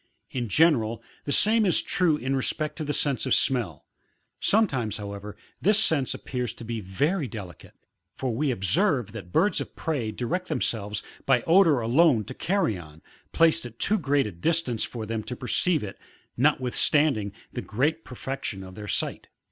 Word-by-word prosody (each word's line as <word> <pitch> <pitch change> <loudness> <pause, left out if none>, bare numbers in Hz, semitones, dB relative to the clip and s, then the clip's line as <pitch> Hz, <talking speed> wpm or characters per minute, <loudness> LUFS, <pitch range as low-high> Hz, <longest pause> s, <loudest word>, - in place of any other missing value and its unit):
In 120 -4 -3
general, 115 - +3 0.2
the 145 - -2
same 220 +7 +5
is 185 -4 +3
true 170 -5 +2
in 135 -1 -2
respect 150 +3 -2
to 160 - -3
the 145 - -2
sense 140 -2 0
of 130 - +4
smell; 115 - -1 0.5
sometimes, 135 - +2
however, 100 0 -7 0.2
this 205 +2 +4
sense 160 -11 +2
appears 125 -4 -4
to 115 - -10
be 115 -1 -4
very 140 - -1
delicate; 100 -6 -10 0.4
for 130 -3 -2
we 145 +5 0
observe 125 - +1
that 100 -6 -9
birds 180 - +2
of - - -8
prey 130 -9 -2
direct 175 +12 -3
themselves 105 -2 -2 0.2
by 130 -3 +4
the - - -17
odour 165 -6 +5
alone 125 0 +4
to 130 - -8
carrion, 95 - -2 0.3
placed 165 0 +3
at 115 -1 -15
too 215 - +1
great 140 0 +1
a 105 - -4
distance 125 - -1
for 115 -3 -5
them 110 0 -3
to 125 - -6
perceive 150 +5 +1
it, 95 - -7 0.4
notwithstanding 130 -3 +2 0.2
the - - -3
great 145 +9 -1
perfection 125 -6 -5
of 95 0 -10
their 105 +2 -8
sight. - - -2
130 Hz, 170 wpm, -26 LUFS, 110-160 Hz, 0.5 s, same